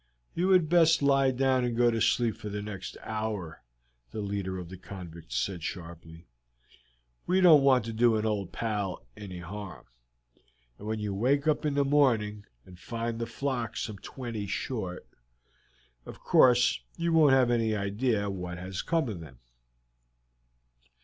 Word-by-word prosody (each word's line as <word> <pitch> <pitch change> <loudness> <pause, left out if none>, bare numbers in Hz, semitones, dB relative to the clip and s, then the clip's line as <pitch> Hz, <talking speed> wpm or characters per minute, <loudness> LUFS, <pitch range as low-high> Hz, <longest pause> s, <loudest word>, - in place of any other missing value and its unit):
"You 180 +3 0
had 180 -4 +5
best 165 -2 +4
lie 135 -1 +4
down 130 0 +1
and 120 -1 -1
go 120 -1 +4
to 115 -1 -1
sleep 115 -3 +2
for 105 -1 -7
the 105 0 -4
next 100 -3 -7
hour," 110 -7 -4 0.5
the - - -6
leader 100 -2 -3
of 90 -2 -7
the 95 - -9
convicts 85 -10 -8
said 90 +7 -2
sharply. 85 -1 -8 1.0
"We 185 +1 +3
don't 165 -6 +7
want 130 -4 +4
to 115 - -5
do 115 0 +3
an 110 0 -1
old 105 -4 -2
pal 105 - -3
any 95 -3 -8
harm, 90 -4 -8 0.9
and 105 - -8
when 110 0 -1
you 105 -2 -3
wake 135 +8 +1
up 155 0 +1
in 145 - -1
the 140 0 +2
morning 115 -8 +2 0.2
and 90 -1 -14
find 115 +1 -4
the 115 - -3
flock 120 0 -3
some 105 -3 -4
twenty 115 -5 -6
short, 95 -4 -4 1.0
of - - -9
course 125 0 +4 0.2
you 170 -1 0
won't 155 -4 +6
have 130 -2 +4
any 115 -2 +1
idea 100 +1 0
what 90 -2 -5
has 95 +1 -5
come 165 -4 0
of 105 -6 -5
them." 70 -6 -12
110 Hz, 165 wpm, -29 LUFS, 95-130 Hz, 1.0 s, don't